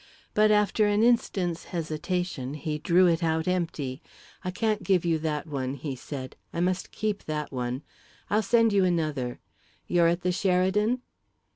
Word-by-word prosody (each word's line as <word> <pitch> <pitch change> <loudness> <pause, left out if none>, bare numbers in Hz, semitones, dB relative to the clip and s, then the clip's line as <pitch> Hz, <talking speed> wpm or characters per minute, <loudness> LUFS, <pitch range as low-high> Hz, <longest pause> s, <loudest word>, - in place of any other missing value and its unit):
But, 215 0 +5
after 210 0 +3
an 205 +1 +3
instant's 190 -8 +1
hesitation, 160 -3 -3
he 150 0 -3
drew 175 +4 +4
it 170 -1 +3
out 160 0 0
empty. 160 -7 -2 0.4
"I 185 - -2
can't 215 +3 0
give 185 -4 +2
you 165 -2 +2
that 155 -2 -2
one," 135 -3 -3
he 140 0 -5
said; 130 0 -7 0.2
"I - - -4
must 180 +1 0
keep 215 -2 -2
that 150 -1 -3
one. 125 +1 -3 0.4
I'll 210 +2 +2
send 225 +1 +3
you 195 -1 +4
another. 155 -8 0 0.5
You're 175 -1 +3
at 170 +1 +1
the 180 - +1
Sheridan?" 195 +6 +1
175 Hz, 160 wpm, -27 LUFS, 150-195 Hz, 0.5 s, But